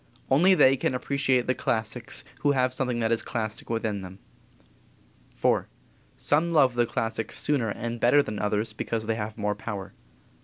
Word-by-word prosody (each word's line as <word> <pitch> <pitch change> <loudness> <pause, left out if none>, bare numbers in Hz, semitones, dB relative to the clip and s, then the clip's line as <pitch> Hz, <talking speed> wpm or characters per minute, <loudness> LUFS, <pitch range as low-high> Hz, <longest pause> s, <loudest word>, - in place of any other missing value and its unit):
Only 180 +8 +5
they 135 -4 +5
can 130 - -1
appreciate 130 -1 +1
the 130 - +1
classics 115 0 -1 0.2
who 145 -1 +2
have 130 -1 +1
something 125 -2 -1
that 110 0 +1
is 115 - +3
classic 110 -2 -4
within 110 -3 -2
them. 95 0 -9 1.2
IV. - - +2 0.5
Some 155 +4 +1
love 145 -6 +4
the 120 -1 +1
classics 115 -1 -2
sooner 135 -7 +1
and 115 +3 -4
better 135 +5 +5
than 105 -4 -5
others 105 +1 -1
because 110 0 -3
they 115 - 0
have 110 0 -5
more 105 -1 0
power. 105 -2 -6
115 Hz, 165 wpm, -26 LUFS, 110-130 Hz, 1.2 s, Only